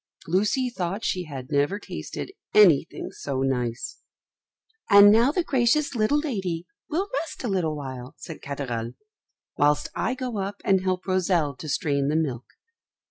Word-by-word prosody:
Lucy 210 - +1
thought 195 -3 -3
she 180 -1 -1
had 135 -4 -8
never 145 +8 +2
tasted 210 - -6 0.2
anything 180 -9 +4
so 135 -2 -3
nice. 125 -3 -2 0.9
"And 200 0 +9
now 230 +5 +5
the 355 +3 0
gracious 270 +2 +2
little 230 +5 +2
lady 190 - -2 0.2
will 360 +6 -1
rest 325 - -7
a - - -1
little 180 -7 0
while," 130 0 -7
said 165 - -9
Katherl, 125 -5 -4 0.7
"whilst 145 0 +3
I 250 - -1
go 250 -5 -4 0.3
and 190 -1 +4
help 185 0 -1
Rosel 180 -6 +1
to 155 +4 -8
strain 140 -1 0
the 150 - +1
milk." 135 -7 -1
180 Hz, 145 wpm, -25 LUFS, 140-220 Hz, 0.9 s, And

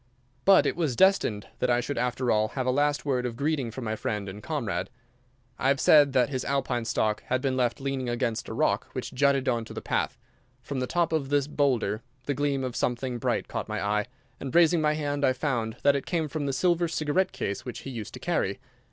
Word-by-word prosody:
But 195 -1 +7
it - - +1
was 155 -8 0
destined 190 - +3
that 125 - +1
I 120 0 +3
should 125 +1 -3
after 125 0 0
all 110 0 +3
have 130 - 0
a 130 - +2
last 145 +2 +1
word 130 -3 +1
of 120 -2 -3
greeting 140 -2 -1
from 120 +3 -7
my 110 -1 -2
friend 105 -1 -3
and 100 +2 -7
comrade. 115 - -2 0.7
I - - +1
have 140 0 +3
said 145 -3 +6
that 125 -2 +3
his 130 -2 -2
Alpine 130 -4 -1
stock 110 -1 0
had 130 - +1
been 130 0 -1
left 120 -2 0
leaning 135 -2 -2
against 120 -2 -2
a - - -4
rock - - +1
which - - -5
jutted 140 0 +2
on 120 -3 +1
to - - -10
the - - -3
path. - - -1 0.5
From 140 -2 -4
the 125 - -1
top 170 +1 +1
of 145 -4 0
this 145 -1 +2
boulder 130 -8 0 0.2
the 145 - 0
gleam 140 -1 0
of 125 -2 -3
something 125 0 -1
bright - - -1
caught - - -4
my - - -2
eye, 105 +2 0 0.3
and, 135 +1 -6
raising 170 -1 +5
my 150 0 +3
hand, 145 -2 -2
I 130 - +4
found 120 -5 -2
that 140 0 +5
it 140 - -3
came 165 -3 0
from 145 -1 -3
the - - +1
silver 175 +3 +2
cigarette 160 +3 0
case 100 - -3
which 125 - -6
he 135 - -7
used 115 -4 -6
to - - -8
carry. - - -1
130 Hz, 230 wpm, -27 LUFS, 120-145 Hz, 0.7 s, But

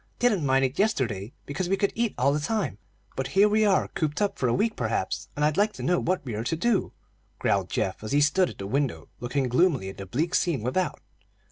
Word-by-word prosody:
Didn't 220 -9 +2
mind 135 -1 +3
it 130 +5 -4
yesterday, 120 - 0
because 175 +5 -3
we 195 - +2
could 200 -1 +1
eat 230 -2 -1
all 135 +3 +3
the 150 - 0
time; 145 - -2 0.4
but 135 0 -2
here 205 +2 +7
we 215 +1 +3
are 200 -3 +3
cooped 150 -2 -2
up 205 -1 0
for 130 - +1
a - - +2
week, 220 +2 +1
perhaps, 110 -5 -2
and 150 - +1
I'd 150 +1 +1
like 210 +1 +3
to - - -8
know 175 0 +2
what 185 -3 -1
we 120 - -4
are 105 +1 -3
to 140 - -1
do," 210 +4 +1 0.5
growled - - 0
Geoff, 95 +2 -2
as 110 - -5
he 145 - +4
stood 160 +5 +3
at - - -11
the 100 - -6
window 135 +5 -1
looking 130 +2 -1
gloomily 130 - +2
at 95 - -10
the 100 - -7
bleak 155 - -1
scene 165 - +1
without. 180 +10 -1
145 Hz, 240 wpm, -26 LUFS, 125-195 Hz, 0.5 s, here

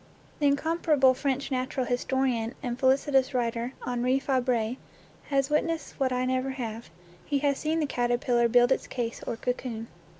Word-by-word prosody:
The 290 - +3
incomparable 285 -2 +3
French 275 +1 -2
natural 255 0 -1
historian 245 -1 0
and 245 0 -3
felicitous 270 0 +3
writer 235 +1 -1
Henri 250 +1 +1
Fabre 250 -3 0 0.5
has 275 0 0
witnessed 320 +1 -1
what 265 -2 +1
I 250 0 0
never 255 +1 0
have: 235 -4 -5 0.3
he 285 - 0
has 280 -1 +2
seen 315 +1 0
the 310 - +1
caterpillar 240 -2 +1
build 245 +1 +5
its - - +1
case 235 -2 -4
or 230 - -2
cocoon. 240 -2 -3
255 Hz, 155 wpm, -28 LUFS, 245-275 Hz, 0.5 s, build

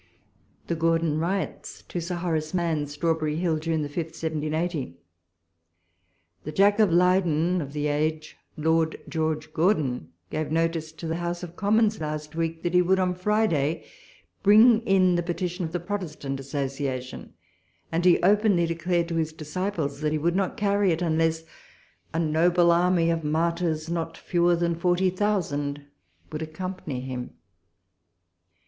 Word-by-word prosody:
THE - - -2
GORDOy 165 -1 +1
PIOTS. 185 +4 -3
To 175 - -3
Sir 175 +2 -3
Horace 165 -2 -2
Mann. 165 -4 0
Strawbrrr;/ 155 +1 -1
Hill, 165 -2 0
June 160 -2 -1
5. 145 - -15
1780.... 160 - -2 1.5
The 155 - -5
Jack 200 +5 +4
of 210 -5 +4
Leyden 180 -1 +3
of 140 -1 -7
the 150 0 -2
age, 155 +1 -1 0.2
Lord 160 +1 +1
George 155 -1 -2
Gordon, 150 - +1 0.2
gave 155 -1 -2
notice 165 -1 0
to 160 +1 -9
the 165 +1 -2
House 175 +1 -3
of 175 -1 -8
Commons 215 0 +2
last 150 0 -4
week, 165 0 -2
that 175 - -1
he 180 - +6
would, 185 +2 +3
on 185 -1 +1
Friday, 180 -6 0 0.6
bring 220 +3 +6
in 185 -2 +4
the - - +1
petition 175 +1 -3
of 160 - -5
the 175 - -2
Protestant 170 -7 -4
Associa 135 -1 -3
tion; 125 +1 -10 0.6
and 165 +1 0
he 180 -1 +5
openly 200 -2 +4
declared 170 +1 0
to 165 - -2
his 160 -1 0
disciples, 155 0 -3
that 150 0 0
he 155 - +1
would 170 +3 0
not 195 -1 -1
carry 200 -2 +2
it 165 +2 -1
unless 160 0 +1 0.7
a - - -3
noble 170 +2 +3
army 170 -1 +3
of 165 - 0
inarfijrs, 160 +1 0
not 165 -1 -3
fewer 175 -1 +2
fhan 170 0 0
forty 180 +1 +2
thousand, 145 -8 -1 0.5
would 155 0 -4
ac 155 0 -6
company 180 -7 -5
him. 125 -1 -6
165 Hz, 155 wpm, -26 LUFS, 155-180 Hz, 1.5 s, he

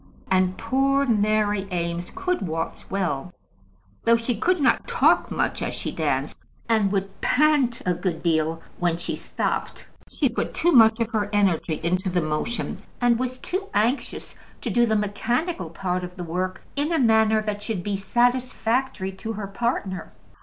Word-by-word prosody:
And 185 0 +2
poor 270 +4 +2
Mary 210 -3 +1
Eames 170 0 -2
could 365 -1 -1
waltz 165 -2 -4
well; 180 -4 -2 0.7
though 230 - +5
she 230 +1 -1
could 355 - +1
not 280 - +2
talk - - +3
much - - -1
as - - -2
she - - -3
danced, - - -2 0.3
and 220 -4 +2
would 195 -1 -3
pant 280 -4 +3
a 180 - +2
good 175 -1 -3
deal 165 -1 +1 0.2
when 175 -2 +1
she 170 - -3
stopped. - - -3 0.2
She 285 - +1
put 235 - -3
too 345 - +3
much 225 -4 +6
of 230 -1 -1
her 210 -2 0
energy 185 -6 +1
into 185 +3 0
the 180 0 +1
motion, 155 +9 -2 0.2
and 240 -1 +3
was 255 0 -2
too 380 +8 -4
anxious 230 +7 0 0.3
to - - -2
do 240 0 +3
the 220 - +2
mechanical 215 - -1
part 180 +2 -2
of 180 0 -7
the 180 - -5
work 185 +2 -3
in 290 +3 0
a 330 - +2
manner 220 -3 +4
that 210 -1 -3
should 205 -4 -3
be 205 +1 -1
satisfactory 240 0 0
to 220 +4 -6
her 210 -1 -4
partner. 195 -4 -3
210 Hz, 165 wpm, -24 LUFS, 185-245 Hz, 0.7 s, much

